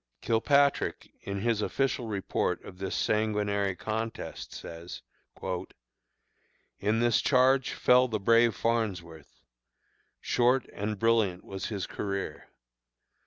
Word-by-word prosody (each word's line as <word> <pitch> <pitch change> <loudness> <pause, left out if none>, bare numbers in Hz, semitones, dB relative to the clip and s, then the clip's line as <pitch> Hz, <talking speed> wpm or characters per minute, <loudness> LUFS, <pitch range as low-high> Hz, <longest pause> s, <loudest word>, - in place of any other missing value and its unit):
Kilpatrick, 140 +5 +2
in 100 0 -4
his 115 -1 +1
official 135 0 -1
report 100 -3 -1
of 90 - -11
this 95 -1 -3
sanguinary 105 -2 0
contest, 110 +3 -5
says: 85 +1 -8 1.8
"In 110 +3 +1
this 120 -2 +3
charge 130 0 +3
fell 125 +1 +4
the 110 -3 -2
brave 115 +2 +4
Farnsworth. 95 -9 -3 0.8
Short 125 - +2
and 105 +1 -3
brilliant 110 -5 +2
was 95 0 -5
his 100 -5 -3
career. 100 -1 -4
110 Hz, 105 wpm, -29 LUFS, 100-120 Hz, 1.8 s, fell